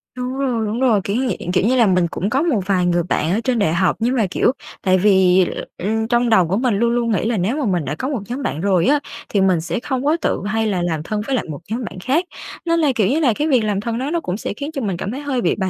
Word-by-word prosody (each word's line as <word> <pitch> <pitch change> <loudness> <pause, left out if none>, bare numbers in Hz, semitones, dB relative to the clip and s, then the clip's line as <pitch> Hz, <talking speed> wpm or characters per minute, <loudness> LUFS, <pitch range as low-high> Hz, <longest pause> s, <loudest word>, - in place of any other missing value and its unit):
Đúng 250 0 -4
rồi, 245 -5 0
đúng 215 +3 -2
rồi, 235 -6 +3
kiểu 200 - -2
như 260 +2 0
vậy. 200 - -4
Kiểu 185 - +2
như 255 - +3
là, 235 -4 +4
mình 180 -2 +2
cũng 195 - -2
có 265 +5 +1
một 310 -10 +1
vài 185 -2 +1
người 175 -1 +2
bạn 165 -1 -1
ở 200 - +1
trên 250 -3 0
đại 165 -6 +2
học, 180 +1 +2
nhưng 245 +3 +1
mà, 220 -6 +2
kiểu, - - +2 0.3
tại 185 -1 +3
vì, 190 -2 +4 0.3
ừm, 220 +4 -1
trong 240 0 +2
đầu 190 -6 +4
của 190 +4 0
mình 245 -1 +1
luôn 235 +3 +2
luôn 235 -1 0
nghĩ 210 - 0
là 230 -1 0
nếu 205 +10 0
mà 295 - -1
mình 180 -7 0
đã 140 +3 -3
có 260 - -3
một 275 -5 -2
nhóm 255 +4 -4
bạn 160 - -2
rồi 185 -3 +2
á, 290 +1 +4 0.3
thì 200 - +1
mình 185 -4 +3
sẽ 170 +5 -3
không 260 +1 -3
có 305 +3 +3
tự - - 0
hay 220 +1 0
là 190 -4 0
làm 165 -3 -2
thân 210 +5 -3
với 270 - 0
lại 250 - -1
một 145 - -5
nhóm 240 +3 -2
bạn 185 - -7
khác. 280 - 0 0.4
Nên 335 0 +2
là, 300 -4 +3
kiểu 210 -4 +2
như 285 +8 +1
là, 265 -8 +3
cái 295 +8 -1
việc 255 -7 +3
làm 205 -2 -1
thân 230 +1 -3
đó 265 +4 -2
nó 340 - +1
cũng 190 - -4
sẽ - - -4
khiến 285 +8 -6
cho 275 - -3
mình 195 -6 -2
cảm 195 +4 -4
thấy 270 - -5
hơi 275 -4 -1
bị - - +1
bài 190 -2 -1
220 Hz, 315 wpm, -19 LUFS, 190-255 Hz, 0.4 s, là